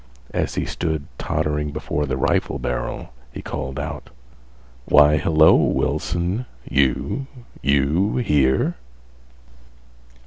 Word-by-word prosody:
As - - -1
he - - -1
stood 80 -4 -3
tottering 75 0 -1
before 75 0 -2
the 65 -1 -2
rifle 65 - 0
barrel, 60 0 -4 0.2
he - - -8
called 65 +1 -5
out: 70 - -6 0.8
"Why, 75 +1 +6
hello, 80 +1 +5
Wilson, 85 - 0 0.2
you—you 75 - 0
here?" 70 - +2
75 Hz, 95 wpm, -22 LUFS, 70-85 Hz, 0.8 s, Why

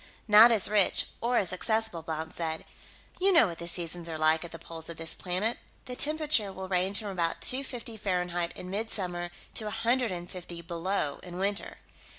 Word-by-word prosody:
"Not 215 +3 +9
as 220 -4 +3
rich, 205 -2 +3 0.2
or 240 +1 +2
as 185 -2 +2
accessible," 220 -2 0
Blount 160 0 -4
said. 160 -1 -2 0.6
"You 390 +2 +4
know 330 -9 +7
what 170 -4 -5
the 170 - -4
seasons 170 -1 -2
are 160 - -4
like, 155 +1 +3
at 170 - -8
the 165 - -7
poles 165 0 -5
of 165 - -6
this 165 0 +2
planet. 190 +6 -1 0.3
The 250 - -5
temperature 300 -8 +2
will 190 0 -7
range 185 +2 +1
from 210 -2 -2
about 170 -4 -1
two 260 +2 +2
fifty 235 -3 -6
Fahrenheit 180 -3 -1
in 180 - -7
mid 220 +3 -2
summer 175 -4 -2 0.2
to 215 - -4
a 210 - -4
hundred 245 -2 +2
and 175 -1 -5
fifty 175 -2 -8
below 170 -3 -2
in 180 -1 -8
winter. 200 +2 -2
185 Hz, 200 wpm, -29 LUFS, 170-220 Hz, 0.6 s, Not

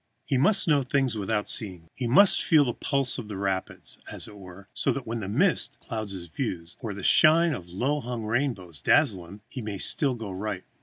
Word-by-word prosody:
He - - -1
must 185 +12 +3
know 150 -3 +3
things 135 -2 0
without 105 0 -2
seeing 90 -7 -5
them; 120 -3 -2
must 200 - +6
feel 155 -4 +4
the 120 - -2
pulse 135 -1 +3
of 115 - -7
the 105 -2 -6
rapids, 95 -1 -3
as - - -4
it 105 - -12
were, 95 0 -13
so - - 0
that 135 -3 -4
when 115 0 -4
a 95 - -5
mist 105 - +1
clouds 110 -3 -5
his 90 -2 -7
view, 85 - -4
or 110 -6 -5
the 100 - -8
shine 165 - +5
of 90 -10 -7
a - - -16
low 130 +11 -1
hung 120 -3 -5
rainbow 115 -5 -2
dazzles 105 - +2
him, 100 +3 -12
he 125 +1 -7
may 105 -2 -5
still 135 +7 +3
go 110 -4 -7
right. 95 0 -5
110 Hz, 220 wpm, -26 LUFS, 95-135 Hz, -, must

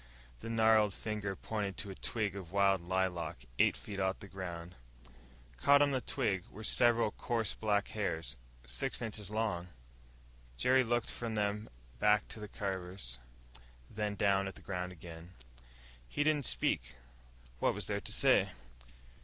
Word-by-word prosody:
The - - -6
gnarled 110 -3 +4
finger 105 -3 -3
pointed 100 -1 -3
to 100 - -4
a - - -5
twig 105 0 -2
of 90 -4 -7
wild 100 -1 +4
lilac 85 -7 -1
eight - - +4
feet 100 -2 -6
off 95 0 +1
the 100 - -11
ground. 90 -2 -6 0.8
Caught 140 - +6
on 145 - +2
the 130 -2 0
twig 95 -5 0
were 110 - -10
several 115 0 +4
coarse 115 -1 -1
black 105 -2 0
hairs, 85 -10 -2 0.3
six 60 0 0
inches 105 -3 -3
long. 105 -5 -1 0.9
Jerry 130 - +4
looked 120 -1 0
from 115 -2 -4
them 105 0 -1 0.3
back 105 +5 +4
to - - -7
the 105 - -6
Carvers, 95 -11 -4 0.7
then 105 -1 -2
down 100 -1 +2
at 95 - -6
the - - -14
ground 90 -1 -3
again. 85 +1 -11 0.7
He 145 - +1
didn't 150 -4 +2
speak. - - 0 0.6
What - - +2
was - - -1
there - - -1
to - - -4
say? - - +5
100 Hz, 155 wpm, -34 LUFS, 90-110 Hz, 0.9 s, Caught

